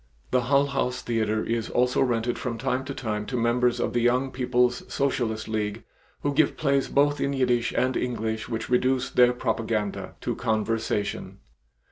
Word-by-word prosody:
The 125 Hz, -, +3 dB
Hull 140 Hz, +2 st, +4 dB
House 125 Hz, -2 st, -2 dB
theater 110 Hz, -2 st, 0 dB
is 115 Hz, -1 st, -2 dB
also 125 Hz, 0 st, +2 dB
rented 120 Hz, -2 st, 0 dB
from 115 Hz, -3 st, -3 dB
time 125 Hz, +3 st, -1 dB
to 140 Hz, -, -4 dB
time 105 Hz, -3 st, -3 dB
to 125 Hz, -, -2 dB
members 120 Hz, +1 st, +2 dB
of -, -, -1 dB
the 120 Hz, -, +2 dB
Young 125 Hz, +3 st, +2 dB
People's 125 Hz, -1 st, +1 dB
Socialist 120 Hz, -5 st, -1 dB
League 110 Hz, 0 st, -2 dB, 0.4 s
who 145 Hz, -, +1 dB
give 150 Hz, 0 st, +2 dB
plays 140 Hz, -3 st, +1 dB
both 145 Hz, +1 st, +2 dB
in 140 Hz, -, 0 dB
Yiddish 125 Hz, -3 st, +1 dB
and 130 Hz, 0 st, +2 dB
English 110 Hz, -3 st, -2 dB
which 115 Hz, -1 st, -3 dB
reduce 130 Hz, +1 st, +1 dB
their 125 Hz, 0 st, +5 dB
propaganda 110 Hz, -4 st, -2 dB
to -, -, -2 dB
conversation. 110 Hz, -3 st, -1 dB
125 Hz, 165 wpm, -26 LUFS, 110-130 Hz, 0.4 s, their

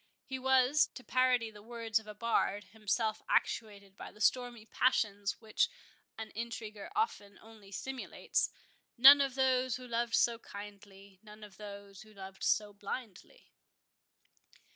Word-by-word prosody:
He 265 Hz, -1 st, -5 dB
was, 265 Hz, +2 st, +4 dB
to 255 Hz, -, -9 dB
parody 250 Hz, -3 st, +2 dB
the 210 Hz, -1 st, -13 dB
words 225 Hz, 0 st, -1 dB
of 220 Hz, -, -16 dB
a 210 Hz, -, -8 dB
bard, 205 Hz, -2 st, 0 dB
himself 220 Hz, +1 st, -2 dB
actuated 200 Hz, -3 st, -1 dB
by -, -, -9 dB
the -, -, -19 dB
stormy 240 Hz, 0 st, +1 dB
passions 205 Hz, -5 st, 0 dB
which 235 Hz, -, +1 dB, 0.5 s
an 220 Hz, 0 st, -7 dB
intriguer 220 Hz, -2 st, -6 dB
often 210 Hz, -, -2 dB
only 220 Hz, -3 st, -16 dB
simulates,— 265 Hz, +6 st, -2 dB, 0.5 s
None 275 Hz, +4 st, +10 dB
of 270 Hz, -2 st, 0 dB
those 260 Hz, -2 st, +2 dB
who 255 Hz, 0 st, -8 dB
loved 235 Hz, 0 st, 0 dB
so 235 Hz, -1 st, +2 dB
kindly, 200 Hz, -2 st, -12 dB
None 215 Hz, 0 st, -14 dB
of 200 Hz, -2 st, -13 dB
those 200 Hz, -2 st, -10 dB
who 215 Hz, -1 st, -16 dB
loved 190 Hz, 0 st, -10 dB
so 210 Hz, -1 st, +1 dB
blindly. 205 Hz, -, -8 dB
220 Hz, 140 wpm, -33 LUFS, 205-250 Hz, 0.5 s, None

